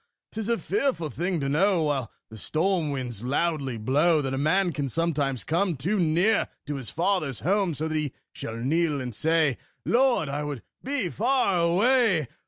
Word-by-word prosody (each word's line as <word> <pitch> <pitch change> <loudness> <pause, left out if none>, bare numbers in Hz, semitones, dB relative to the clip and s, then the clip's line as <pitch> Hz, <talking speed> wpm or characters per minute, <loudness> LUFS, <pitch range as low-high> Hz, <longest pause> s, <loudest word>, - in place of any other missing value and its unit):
'Tis 220 0 -4
a 235 - +2
fearful 260 - -1
thing 175 +1 -1
to 140 - -2
know, 175 +4 +2
While 140 -6 -1 0.2
the 110 - -9
storm 170 - 0
winds 125 -6 -4
loudly 140 -1 -1
blow, 150 +9 +3
That 135 -1 -2
a - - -1
man 175 +5 +2
can 140 0 -2
sometimes 145 -4 -1
come 170 0 0
Too 185 +11 0
near 175 +6 +2 0.2
to 145 -1 -3
his 130 -4 -6
father's 165 - -1
home; 190 -1 +1
So 155 +3 -2
that 160 - -3
he 155 -3 -1 0.2
shall 115 - -6
kneel 150 +4 +1
and 125 -2 -5
say, 155 0 +1 0.3
"Lord, 245 - +3
I 145 +2 -3
would 145 -5 -5 0.2
be 260 -8 -1
far 225 -3 +1
away!" 185 - +3
160 Hz, 180 wpm, -26 LUFS, 140-190 Hz, 0.3 s, blow